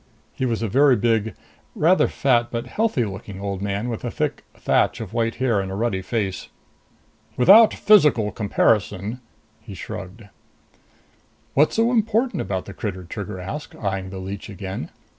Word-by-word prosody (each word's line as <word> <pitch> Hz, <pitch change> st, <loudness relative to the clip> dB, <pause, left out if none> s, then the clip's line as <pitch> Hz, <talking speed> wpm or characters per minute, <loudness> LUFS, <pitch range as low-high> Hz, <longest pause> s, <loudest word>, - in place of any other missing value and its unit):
He 130 Hz, -, -2 dB
was 115 Hz, -2 st, -1 dB
a -, -, 0 dB
very 135 Hz, +4 st, +4 dB
big, 110 Hz, -3 st, 0 dB, 0.4 s
rather 175 Hz, +5 st, +4 dB
fat 120 Hz, -3 st, +1 dB
but 115 Hz, -1 st, -4 dB
healthy 215 Hz, -, 0 dB
looking 95 Hz, 0 st, -8 dB
old 100 Hz, -1 st, -4 dB
man 100 Hz, +3 st, -2 dB
with 115 Hz, -3 st, -4 dB
a -, -, -2 dB
thick -, -, -3 dB
thatch -, -, +1 dB
of 110 Hz, -2 st, -7 dB
white 115 Hz, -1 st, 0 dB
hair 120 Hz, -4 st, +1 dB
and 95 Hz, -1 st, -3 dB
a -, -, -4 dB
ruddy 105 Hz, -3 st, -1 dB
face. 95 Hz, 0 st, -3 dB, 0.9 s
"Without 205 Hz, -, +7 dB
a -, -, -13 dB
physical 150 Hz, -, +4 dB
comparison 105 Hz, +1 st, 0 dB, 0.2 s
" 110 Hz, 0 st, -38 dB
He 105 Hz, -3 st, -10 dB
shrugged. 105 Hz, +3 st, -8 dB, 1.3 s
"What's 150 Hz, +3 st, +3 dB
so 230 Hz, +2 st, +3 dB
important 225 Hz, -2 st, +1 dB
about 95 Hz, -1 st, -3 dB
the 100 Hz, -, -9 dB
critter?" 95 Hz, -4 st, -5 dB
Trigger 95 Hz, +2 st, -6 dB
asked, 100 Hz, +12 st, -7 dB
eyeing 95 Hz, -2 st, -3 dB
the 95 Hz, -, -7 dB
leech 95 Hz, +2 st, -6 dB
again. 95 Hz, -1 st, -6 dB
110 Hz, 165 wpm, -22 LUFS, 95-125 Hz, 1.3 s, Without